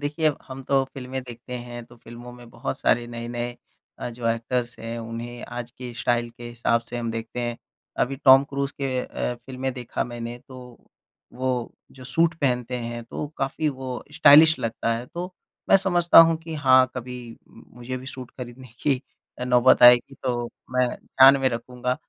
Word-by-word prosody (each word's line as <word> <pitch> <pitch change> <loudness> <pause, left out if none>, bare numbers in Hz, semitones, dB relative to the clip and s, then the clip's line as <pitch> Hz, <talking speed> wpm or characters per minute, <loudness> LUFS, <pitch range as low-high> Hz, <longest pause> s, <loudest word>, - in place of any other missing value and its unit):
देखिए 150 +2 -1
अब 150 - +2
हम 135 0 -7
तो 135 0 +2
फ़िल्में 130 0 -5
देखते 125 0 -9
हैं 120 0 -8
तो 120 0 -18
फ़िल्मों 120 +1 -11
में 120 -1 -13
बहुत 120 +4 -5
सारे 120 0 +2
नए-नए 120 +1 -5 0.4
अ, - - -4
जो 115 0 -6
एक्टर्स 120 +1 -2
हैं, 115 +1 -5
उन्हें 115 +1 -7
आज 120 0 -7
की 125 -1 -9
स्टाइल 120 0 0
के 120 +1 -13
हिसाब 115 0 0
से 120 +1 -8
हम 115 -1 -3
देखते 115 +2 -5
हैं। 120 -1 -3 0.5
अभी 135 +2 -6
टॉम 135 0 +7
क्रूज 140 0 -2
के 135 -2 -3
अ, 125 - -3
फ़िल्में 130 +2 -5
देखा 125 -2 -4
मैंने 120 0 -6
तो 130 -1 -10 0.8
वो 130 - +1 0.5
जो 130 - -10
सूट 165 +6 +2
पहनते 125 -2 0
हैं 120 0 -5
तो 145 - -5
काफ़ी 140 +3 -1
वो 130 -1 -5 0.2
स्टाइलिश 155 +2 +7
लगता 115 0 -1
है 120 +2 -7
तो 180 +2 -5 0.4
मैं - - +8
समझता 175 -3 +4
हूँ 165 - +1
कि 165 -1 -6
हाँ 130 0 +7
कभी 125 0 -6 0.3
मुझे 125 +1 -9
भी 130 +1 -9
सूट 130 -2 -8
खरीदने 125 0 -10
की 135 -3 +1 0.4
अ, - - -1
नौबत 125 0 +4
आएगी 125 +2 +7
तो 120 -2 -1 0.3
मैं 125 -1 +3 0.2
ध्यान 135 +1 +7
में 130 - +3
रखूँगा। 125 +1 -3
125 Hz, 180 wpm, -24 LUFS, 120-135 Hz, 0.8 s, मैं